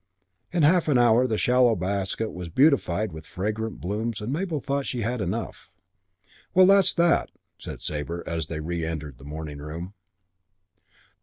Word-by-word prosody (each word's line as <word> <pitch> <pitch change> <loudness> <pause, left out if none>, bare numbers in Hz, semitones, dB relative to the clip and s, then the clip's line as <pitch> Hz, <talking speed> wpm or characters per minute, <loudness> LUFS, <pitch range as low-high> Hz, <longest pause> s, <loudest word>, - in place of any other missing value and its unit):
In 175 -3 +1
half 165 +3 +4
an 145 -4 +4
hour 120 +1 +5
the 110 -3 -1
shallow 125 -1 +4
basket 100 +3 -2
was 90 -1 -7
beautified 110 - +2
with 80 -1 -10
fragrant 110 +4 -3
blooms 105 +4 -3
and 110 +5 -3
Mabel 165 -1 -2
thought 140 +1 -2
she 125 - -3
had 120 +2 -2
enough. 95 +2 -4 0.9
"Well, 185 0 +8
that's 195 0 +6
that," 170 0 +3 0.3
said - - -8
Sabre 80 +3 -3
as 80 -3 -3
they 80 -1 -4
reëntered 80 -4 -4
the - - -14
morning 75 0 -6
room. 80 +6 -7
105 Hz, 155 wpm, -25 LUFS, 85-130 Hz, 0.9 s, Well